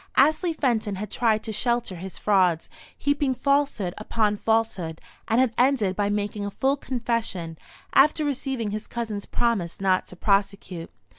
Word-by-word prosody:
Astley 310 +5 +4
Fenton 235 -9 0
had 205 +1 -6
tried 220 -3 +1
to 220 - -4
shelter 235 -2 0
his 185 +2 -7
frauds, 185 -5 +2 0.3
heaping 285 -2 +1
falsehood 275 -10 +1
upon 210 -1 +1
falsehood; 205 -7 0 0.3
and 225 +1 +3
had 255 -3 +3
ended 245 -7 +3
by 205 0 0
making 205 0 -2
a 200 - -2
full 270 +7 +1
confession, 230 - -2 0.4
after 300 +2 +5
receiving 265 -6 -2
his 215 +1 -5
cousin's 220 -4 -4
promise 220 -8 0
not 190 -1 +2
to - - -9
prosecute. 195 -3 0
215 Hz, 150 wpm, -25 LUFS, 195-255 Hz, 0.4 s, after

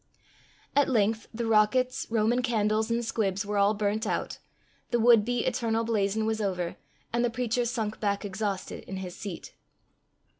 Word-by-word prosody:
At 285 -1 +4
length 220 -2 +1
the 235 +1 -3
rockets, 225 +4 +2
Roman 225 +2 +2
candles, 220 -2 +1
and 235 0 0
squibs 200 -4 -1
were 205 0 -1
all 200 +2 +4
burnt 210 +1 -1
out, - - -2 0.5
the 240 - +1
would 230 -2 +6
be 245 +1 -1
"eternal 230 -3 0
blazon" 215 -1 0
was 220 0 -1
over, 180 -4 -2 0.4
and 235 0 +2
the 240 - +2
preacher 240 0 -1
sunk 220 -2 -2
back 200 -1 -1
exhausted 200 -1 -3
in 190 - -6
his 185 -2 -6
seat. 195 -5 -7
220 Hz, 160 wpm, -28 LUFS, 205-235 Hz, 0.5 s, would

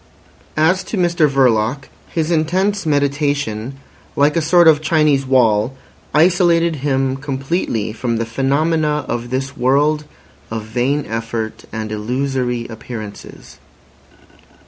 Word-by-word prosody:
As 165 +5 +3
to 220 - -4
Mr 175 -4 +2
Verloc, 130 -1 +1 0.2
his 160 0 -1
intense 185 +4 0
meditation, 140 -5 0 0.4
like 145 +1 +3
a 165 - +2
sort 170 +2 +5
of 155 -2 +6
Chinese 150 -4 +2
wall, 120 -2 +3 0.4
isolated 170 0 +3
him 135 -1 0
completely 135 - -2
from 115 0 -2
the 115 - -1
phenomena 150 +4 0
of 120 0 -3
this 135 +2 -3
world 145 +4 +2 0.4
of 110 -1 -4
vain 125 +6 -1
effort 115 0 -4
and 110 -1 -5
illusory 125 +2 -2
appearances. 110 -2 -9
135 Hz, 115 wpm, -18 LUFS, 120-155 Hz, 0.4 s, of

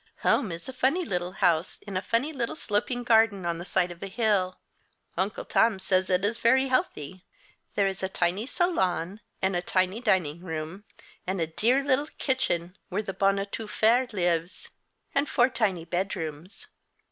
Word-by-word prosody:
Home 220 -9 +2
is 165 0 -7
a 260 - -6
funny 275 +8 +1
little 180 - -2
house, 175 -3 +1
in 200 -2 -6
a 185 - +1
funny 260 +10 0
little 240 -5 -2
sloping 245 0 -1
garden 225 -5 +4
on 170 -1 -1
the 175 - -6
side 180 -2 +1
of 175 - -11
a - - -4
hill. 195 -3 +1 0.6
Uncle 190 +4 -2
Tom 225 -3 +3
says 185 -1 +1
it 185 +1 +2
is 220 +3 0
very 265 +3 +4
healthy. 185 - -1 0.5
There 200 - +3
is 195 -1 -2
a 190 - -1
tiny 185 +5 -1
salon, 205 - 0 0.2
and 190 -1 +2
a 175 - +1
tiny 185 +4 0
dining 180 - +1
room, 165 +3 -6 0.4
and 190 0 -1
a 165 - +2
dear 235 - +2
little 285 +1 +2
kitchen 180 - -1
where 200 +4 -1
the 195 - -4
bonne 195 +1 +2
a 195 - -1
tout 210 +1 -6
faire 240 +5 +3
lives, 175 -3 -1 0.4
and 280 +1 +1
four 245 +2 +4
tiny 200 -9 0
bedrooms. 175 -1 -4
195 Hz, 180 wpm, -27 LUFS, 180-230 Hz, 0.6 s, garden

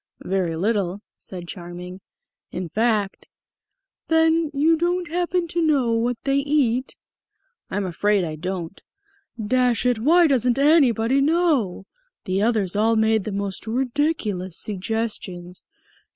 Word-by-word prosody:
"Very 185 -3 -1
little," 200 +1 -1 0.2
said 180 -2 -8
Charming. 180 +1 -8 0.5
"In 180 -2 -5
fact 215 -1 0 0.4
" - - -62
"Then 320 0 +3
you 305 +3 +3
don't 350 +2 -1
happen 350 +1 -1
to 340 - -1
know 285 -7 +2
what 230 +1 0
they 275 0 +1
eat?" 275 -3 0 0.7
"I'm 200 0 -2
afraid 200 +2 +1
I 160 -2 -4
don't." 180 +2 -5 0.7
"Dash 250 0 +2
it, 245 -3 +2
why 335 +9 +5
doesn't 250 -4 +2
anybody 275 -4 +4
know? 290 - +1 0.4
The 190 +1 0
others 210 -4 +1
all 220 +2 +3
made 220 -2 +2
the 215 - -3
most 200 +1 -4
ridiculous 235 - -1
suggestions. 195 -4 -4
225 Hz, 125 wpm, -23 LUFS, 190-285 Hz, 0.7 s, why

